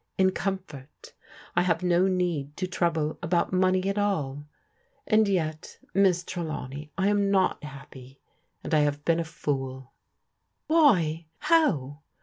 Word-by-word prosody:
c 190 - +4
oxifcrL 190 -7 -3 0.7
I 175 - +4
have 180 0 0
no 180 +1 +3
need 175 -6 -1
to 185 - -1
trouble 165 -4 -1
about 175 0 0
csccey 185 +1 +2
ar 205 - +1
all; 145 -7 -2 0.6
and 215 -1 +3
jet^ 160 -4 -2 0.2
Miss 185 -2 +3
Tidawney, 150 -5 -5
I 190 0 +2
am 205 -1 +2
not 190 -5 +1
happy, 135 -2 -11 0.5
azd - - -4
I 155 - +5
have 145 0 0
been 165 0 +2
a - - +1
f 160 -1 -11
oc4.* 135 -2 -2 0.8
WliT? 175 - +4
How? 180 - +1
170 Hz, 140 wpm, -27 LUFS, 150-190 Hz, 0.8 s, I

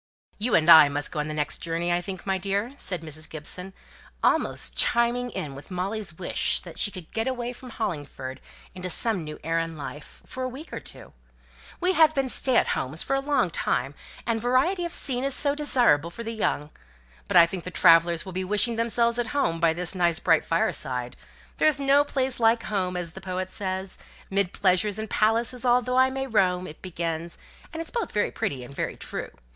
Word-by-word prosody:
"You 230 +3 +1
and 155 -1 +3
I 160 -3 +9
must 145 +1 -2
go - - -4
on 150 - -2
the 155 - -4
next 150 -1 -1
journey, 170 +1 -1
I 175 - +1
think, 185 0 -7
my 190 -1 0
dear," 200 +6 -2
said 185 - -2
Mrs. 155 0 -3
Gibson, 180 +5 -3 0.5
almost - - +1
chiming 240 +1 +2
in 150 - -5
with 140 +1 -11
Molly's 190 -1 -4
wish 180 - +1
that - - -11
she - - +2
could 185 -5 -11
get 225 +2 -1
away 245 -1 -3
from 255 +1 -12
Hollingford 145 - -5 0.3
into 185 0 -5
some 195 0 +2
new 150 0 -7
air 165 +1 0
and 165 -1 -4
life, 145 +1 -9
for 260 - -7
a 255 - -1
week 275 +6 -10
or - - -4
two. - - -11 0.7
"We 360 +1 +1
have 315 -2 +5
been 270 -1 0
stay 255 0 +2
at - - +3
homes 145 +6 0
for 270 - -1
a - - +1
long 275 - 0
time, 135 -1 -1 0.3
and 225 -1 -1
variety 270 - +1
of 340 - -5
scene 255 -2 +4
is 275 -1 +1
so 285 -1 +3
desirable 245 - +2
for 235 +7 -8
the 230 0 -4
young! 150 -8 -2 0.6
But - - +3
I 170 - +9
think 175 0 -6
the 180 - -6
travellers 170 -1 +4
will 190 - -8
be 185 +1 -2
wishing 210 +4 +2
themselves 235 +1 +1
at 240 - 0
home 165 -12 +1
by 165 -1 +4
this 175 +2 -2
nice 175 -3 +2
bright 165 -3 +3
fireside. 125 -6 -1 0.4
'There's 310 -2 +3
no 280 +1 +4
place 265 -3 -1
like 230 0 +3
home,' 185 -3 -2
as 175 -2 -2
the 190 - -10
poet 185 0 -4
says. 190 -1 -4 0.3
'Mid 195 -2 +1
pleasures 195 +2 +1
and 220 0 -4
palaces 230 +3 +1
although 250 0 +2
I 260 0 +5
may 270 0 -3
roam,' 185 -7 +1
it 155 - -11
begins, 170 -2 -4 0.3
and 325 - -7
it's - - -9
both 470 -2 -3
very 210 - 0
pretty 130 -3 -3
and 125 - -11
very - - -4
true. - - -6
190 Hz, 210 wpm, -25 LUFS, 165-245 Hz, 0.7 s, I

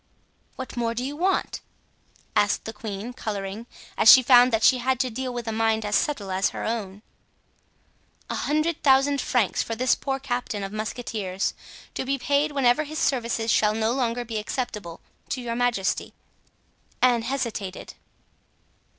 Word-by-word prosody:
"What 260 0 -7
more 230 -1 -1
do 245 - -2
you 285 +2 -4
want?" 370 +5 0 0.7
asked 205 -1 +2
the 220 - -5
queen, 210 +2 -6
coloring, 210 -1 -5 0.3
as 220 - +8
she 260 - +8
found 245 0 +6
that 225 -1 +1
she 255 +2 +5
had 260 0 0
to 255 -2 -1
deal 255 +2 -4
with 240 -1 -5
a - - -1
mind 220 0 +1
as 205 - 0
subtle 210 -11 0
as 190 +1 +1
her - - -6
own. 210 -3 -4 1.2
"A - - -4
hundred 310 +2 0
thousand 275 0 +4
francs 235 -6 +1
for 225 - -3
this 255 +2 +2
poor 270 -1 -2
captain 245 -6 -3
of 195 +1 -6
musketeers, 215 -3 -3 0.4
to - - -3
be 275 +1 -1
paid 285 +3 +1
whenever 275 +1 +3
his 310 +1 -7
services 235 -5 0
shall 215 0 +3
no 220 +1 +1
longer 245 -1 -1
be 225 -2 -3
acceptable 210 -7 -5 0.3
to 260 - -2
your 235 -2 -4
majesty." 240 -5 -1 0.9
Anne 245 -2 +4
hesitated. 230 -6 -4
235 Hz, 160 wpm, -25 LUFS, 215-260 Hz, 1.2 s, as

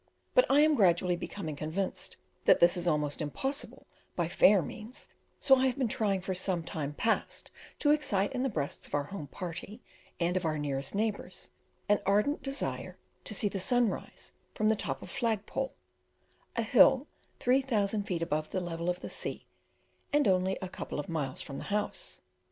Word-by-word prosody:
But - - +5
I 285 - +6
am 310 0 +5
gradually 180 - +3
becoming 170 -3 -5
convinced 160 +6 -3 0.3
that - - +6
this 170 +1 +6
is 175 -1 -1
almost 150 -2 0
impossible 270 - -4 0.3
by 170 -2 0
fair 190 +1 +5
means, 225 +7 -8 0.3
so 270 -2 +6
I 260 +1 +3
have 255 - -1
been 260 -3 +1
trying 205 -3 0
for 190 +1 -2
some 185 -2 -1
time 150 -3 -4
past 225 +6 -1 0.3
to 290 - +3
excite 205 -10 +1
in 255 - -1
the 270 - +1
breasts 150 - -3
of - - -3
our 145 - +1
home 155 -1 -7
party 180 - -6 0.4
and 175 +1 +1
of 185 - 0
our 155 -2 0
nearest 140 +1 -2
neighbours 215 0 -2 0.4
an 205 0 +4
ardent 210 +9 +2
desire 275 0 -3 0.3
to 215 - -2
see 205 - +2
the 200 -1 -3
sun 240 +5 +3
rise - - -7 0.2
from 215 0 +2
the 220 - +4
top - - -3
of - - -9
"Flagpole," 245 +2 -1 0.8
a - - +1
hill - - +6 0.3
3,000 235 -6 +2
feet 180 -5 -2
above 155 -2 -1
the 185 - -1
level 170 -1 -3
of 180 0 -2
the - - -5
sea, - - -4 0.7
and 295 -1 +3
only 190 0 +2
a: - - -2
couple 180 - -5
of 145 - -5
miles 145 -6 -2
from 140 - -7
the - - -7
house. 210 0 -3
195 Hz, 185 wpm, -31 LUFS, 170-230 Hz, 0.8 s, I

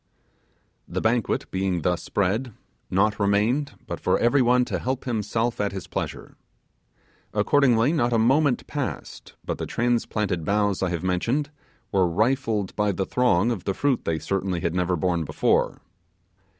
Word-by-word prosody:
The - - -3
banquet 115 0 0
being 95 -3 -1
thus 90 -2 0
spread, 105 +5 -1 0.3
naught 105 +3 +1
remained 105 +8 +1
but - - -5
for - - +2
everyone 125 0 +3
to - - -3
help 130 +1 -2
himself 115 -1 -1
at 100 -1 -1
his 95 - -5
pleasure. - - -5 1.0
Accordingly 135 -1 +3
not 120 -7 +1
a 115 - +3
moment 130 +4 +3
passed - - -5
but - - -3
the - - -3
transplanted 110 -7 0
boughs 100 +2 +1
I 95 - +1
have 85 -1 -3
mentioned 120 +11 0 0.4
were 95 -3 +3
rifled 110 0 0
by 105 -1 +1
the 95 0 -2
throng 120 -3 +2
of 100 -7 -4
the 95 - -1
fruit 140 -4 0
they 80 - 0
certainly 95 0 -2
had 85 - -1
never 90 0 +1
borne 85 0 0
before. - - +1
105 Hz, 150 wpm, -24 LUFS, 95-120 Hz, 1.0 s, everyone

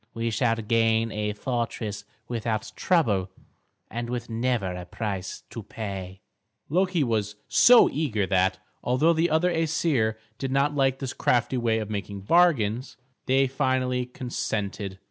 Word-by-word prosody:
We 115 0 -1
shall 115 +1 +2
gain 115 0 +1
a 105 0 -2
fortress 110 -3 -3 0.2
without 115 -2 -2
trouble 105 - +1 0.6
and 120 +1 -5
with 120 -1 -4
never 115 -5 0
a 90 0 -6
price 95 -2 -4
to 115 - -6
pay." 95 -3 -7 0.5
Loki 180 0 +2
was 110 -4 -1
so 245 -1 +7
eager 125 -10 -1
that, 95 0 +2 0.3
although 140 +7 +3
the 165 +2 +1
other 165 +3 +2
Æsir 155 -8 +1 0.2
did 135 -1 -3
not 140 +2 +2
like 135 -2 +2
this 135 -1 -4
crafty 125 +1 +1
way 115 -2 +1
of 110 -1 -4
making 100 -1 -4
bargains, 130 - +2 0.3
they 135 +1 +4
finally 130 -2 0
consented. 105 -6 -4
115 Hz, 140 wpm, -26 LUFS, 105-135 Hz, 0.6 s, so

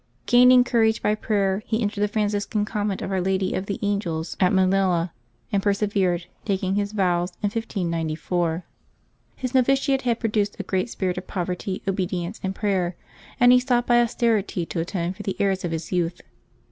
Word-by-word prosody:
Gaining 250 +1 +7
courage 225 -3 +2
by 210 - +3
prayer, 200 -2 0
he 220 - 0
entered 205 -2 -2
the 210 - +3
Francis 205 -1 -1
can 210 -2 0
Convent 210 -2 -2
of - - -4
Our 190 -1 0
Lady 190 0 0
of 185 - -3
the 200 - -2
Angels 185 -6 -2
at 185 -2 +4
Manila, 185 -2 +2 0.4
and 200 - +1
persevered, 200 -4 +1 0.2
taking 190 -2 -1
his 205 0 -1
vows 180 -3 0
in 205 - +2
1594. 170 -4 -2 0.7
His 255 0 -4
novitiate 270 +1 +3
had 235 -3 0
produced 210 -2 -1
a - - -2
great 190 +4 -1
spirit 185 -4 -2
of 180 - -13
poverty, 185 +1 -3
obedience, 185 0 -2
and 190 0 -3
prayer, 190 -4 0 0.4
and 245 0 +7
he 250 - +7
sought 250 -1 +1
by 240 0 +5
austerity 220 -6 0
to 165 - -4
atone 170 +1 -2
for 205 - -9
the 195 -2 -3
errors 195 -2 +1
of 175 - -1
his 165 0 -4
youth. 175 -1 -1
195 Hz, 180 wpm, -24 LUFS, 180-215 Hz, 0.7 s, Gaining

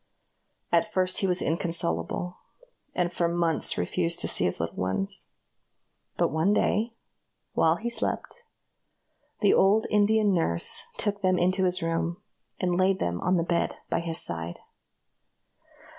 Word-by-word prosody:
At 215 - +2
first 185 -2 +1
he 195 - +1
was 180 0 0
inconsolable, 165 - -2 0.6
and 175 -1 0
for 170 - +1
months 170 -1 +1
refused 170 - -1
to - - -1
see 90 - 0
his 90 - 0
little 85 - -3
ones; 95 +1 -2 0.9
but - - +2
one 160 +7 +2
day, 225 +3 +1 0.6
while 160 0 +3
he 225 +7 -5
slept, 240 - -2 1.0
the 205 - +5
old 205 +3 +4
Indian 210 0 +3
nurse 85 - 0
took 205 -1 -1
them 185 -2 +2
into 185 +2 +2
his 180 -1 0
room, 165 +1 -1 0.4
and 180 -1 0
laid 190 +1 +3
them 85 - -2
on 180 +1 +2
the 165 - +1
bed 170 0 0 0.2
by - - +2
his 170 0 +1
side. 85 0 -1
175 Hz, 145 wpm, -27 LUFS, 165-195 Hz, 1.0 s, the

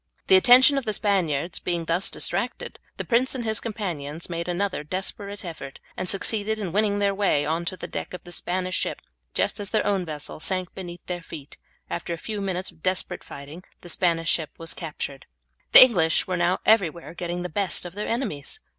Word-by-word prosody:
The 190 - +6
attention 255 +7 +7
of 265 - -10
the 215 - -1
Spaniards 180 -7 0
being 170 -2 -2
thus 170 +4 0
distracted, - - -3 0.2
the - - -4
prince 255 +2 +2
and 240 -3 -3
his 220 0 +1
companions 170 -8 -5
made 170 +1 -3
another 180 -2 -1
desperate 195 +4 -4
effort, 150 -5 -8 0.2
and 185 - -3
succeeded 215 +2 0
in 200 -5 -4
winning 205 +1 +2
their 200 -1 +2
way 195 -7 +2
on 165 +2 -1
to 185 - -4
the - - -6
deck - - -5
of 180 - -10
the 175 - -11
Spanish 185 +1 -2
ship - - -1 0.4
just - - 0
as 200 -1 -3
their 215 - +1
own 195 -2 +1
vessel 150 -3 -6
sank 185 +2 -2
beneath 175 -2 -8
their 175 -1 -4
feet; 155 -3 -10 0.3
after 170 0 -4
a - - -4
few 210 +4 -5
minutes' 190 -1 -2
desperate 180 +2 -2
fighting 145 +5 -10 0.2
the 175 - -10
Spanish 165 -2 +2
ship 160 -3 0
was 165 0 -3
captured. 145 -4 -6 0.4
The - - +14
English 175 -11 +3
were 185 - -2
now 175 +1 +1
everywhere 175 -7 +2
getting 175 0 -4
the - - -2
best 185 +1 0
of 175 - -7
their 210 +2 -4
enemies. 230 - -3
180 Hz, 200 wpm, -25 LUFS, 165-200 Hz, 0.4 s, The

